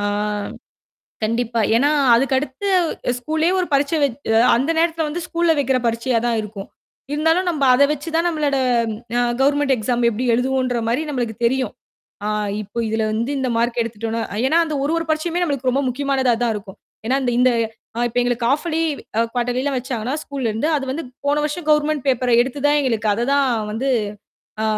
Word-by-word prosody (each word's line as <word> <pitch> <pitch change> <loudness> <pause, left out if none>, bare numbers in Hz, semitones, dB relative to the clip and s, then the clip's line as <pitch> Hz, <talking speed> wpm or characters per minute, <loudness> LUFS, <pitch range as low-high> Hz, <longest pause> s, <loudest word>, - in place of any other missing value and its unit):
ஆ - - -3 1.2
கண்டிப்பா, 230 +1 -1 0.2
ஏன்னா, 285 +5 +3 0.2
அதுக்கடுத்து 265 +6 0 0.5
ஸ்கூல்லயே 315 +7 0
ஒரு 360 - -1
பரிட்சை 285 +3 +2
வச்சு 250 -3 -2 0.2
அந்த 270 +7 0
நேரத்துல 325 -1 +1
வந்து 335 +4 -4
ஸ்கூல்ல 340 -1 +2
வைக்கிற 265 -2 +2
பரிட்சையா 230 +1 +1
தான் 235 - +1
இருக்கும். 205 -1 -8 0.4
இருந்தாலும், 325 +5 +2
நம்ப 300 -5 0
அதை 280 +3 +5
வச்சு 300 +2 -5
தான் 335 +1 +2
நம்மளோட 295 -4 0 0.6
அ - - +3 0.2
கவர்மென்ட் 285 0 +3
எக்ஸாம் 240 +2 -1
எப்பிடி 235 +3 -2
எழுதுவோம்ன்ற 255 -1 0
மாரி 245 +6 +1
நம்மளுக்கு 240 -5 -3
தெரியும். 255 -2 0 0.5
ஆ - - 0 0.3
இப்போ, 205 +3 -8
இதுல 220 0 0
வந்து 230 +4 -1
இந்த 260 -1 -1
மார்க் 240 +1 0
எடுத்துட்டோம்னா 225 0 -3 0.2
ஏன்னா, 320 +5 +3
அந்த 310 - -3
ஒரு, 305 - 0
ஒரு 330 - -4
பரிட்சையுமே 335 +3 0
நம்மளுக்கு 275 -5 0
ரொம்ப 275 +3 0
முக்கியமானதா 265 -1 +1
தான் 225 -2 0
இருக்கும். 195 -2 -10 0.3
ஏன்னா 260 - +2 0.2
இந்த 255 - +5 0.6
இப்ப, 230 - -14
எங்களுக்கு 245 -1 -1
ஹால்ஃப் 290 +4 +1
இயர்லி, 330 - +1 0.5
குவாட்டர்லி 245 +1 0
எல்லாம் 280 -2 -1
வச்சாங்கன்னா, 250 0 -3
ஸ்கூல்ல 270 -5 -3
இருந்து. 225 +9 -1
அது 275 - -2
வந்து 315 +5 -3 0.2
போன 290 +1 +2
வருஷம் 305 +2 -3
கவர்மென்ட் 300 -2 +2
பேப்பர் 250 -2 +1
எடுத்து 265 +3 -1
தான் 295 0 +3
எங்களுக்கு 225 -5 0
அதை 235 +3 -1
தான் 280 -2 +3 0.2
வந்து 260 +5 -2 0.7
ஆ - - 0
265 Hz, 170 wpm, -20 LUFS, 235-295 Hz, 1.2 s, அதை